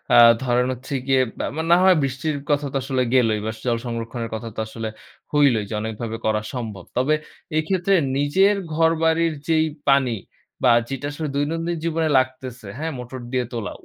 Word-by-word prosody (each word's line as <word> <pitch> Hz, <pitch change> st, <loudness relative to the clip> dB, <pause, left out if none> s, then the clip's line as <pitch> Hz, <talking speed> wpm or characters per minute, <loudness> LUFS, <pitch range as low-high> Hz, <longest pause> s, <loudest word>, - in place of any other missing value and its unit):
আ -, -, +8 dB, 0.3 s
ধরেন 125 Hz, 0 st, +2 dB
হচ্ছে 130 Hz, +3 st, -8 dB
গিয়ে 135 Hz, -1 st, +4 dB, 0.2 s
আ -, -, -1 dB, 0.2 s
না -, -, +9 dB
হয় 190 Hz, -1 st, +6 dB
বৃষ্টির 140 Hz, +3 st, -2 dB
কথা 145 Hz, 0 st, +2 dB
তো -, -, +1 dB
আসলে 130 Hz, -1 st, 0 dB
গেলোই 115 Hz, -4 st, +3 dB
বাস 110 Hz, 0 st, -4 dB
জল 120 Hz, -1 st, +2 dB
সংরক্ষণের 115 Hz, 0 st, -4 dB
কথা 115 Hz, +1 st, -5 dB
তো -, -, -5 dB
আসলে 110 Hz, 0 st, -5 dB, 0.4 s
হইলোই 135 Hz, -8 st, +3 dB
যে -, -, -5 dB
অনেকভাবে 110 Hz, +1 st, -4 dB
করা 110 Hz, 0 st, +1 dB
সম্ভব। 110 Hz, -7 st, -5 dB
তবে 135 Hz, +5 st, +3 dB, 0.4 s
এক্ষেত্রে 185 Hz, +4 st, +2 dB, 0.2 s
নিজের 190 Hz, +9 st, +3 dB, 0.2 s
ঘরবাড়ির 165 Hz, 0 st, +2 dB
যেই 160 Hz, -1 st, +3 dB, 0.2 s
পানি 130 Hz, -4 st, +4 dB, 0.5 s
বা, 125 Hz, -, +6 dB, 0.2 s
যেটা 135 Hz, +1 st, -3 dB
আসলে 155 Hz, +1 st, -4 dB
দৈনন্দিন 165 Hz, +4 st, -1 dB
জীবনে 165 Hz, -1 st, 0 dB
লাগতেছে, 130 Hz, -3 st, -2 dB
হ্যা? 160 Hz, +2 st, -3 dB
মোটর 125 Hz, +1 st, -7 dB
দিয়ে 125 Hz, -1 st, 0 dB
তোলা। 115 Hz, -3 st, -3 dB
130 Hz, 170 wpm, -22 LUFS, 115-155 Hz, 0.5 s, না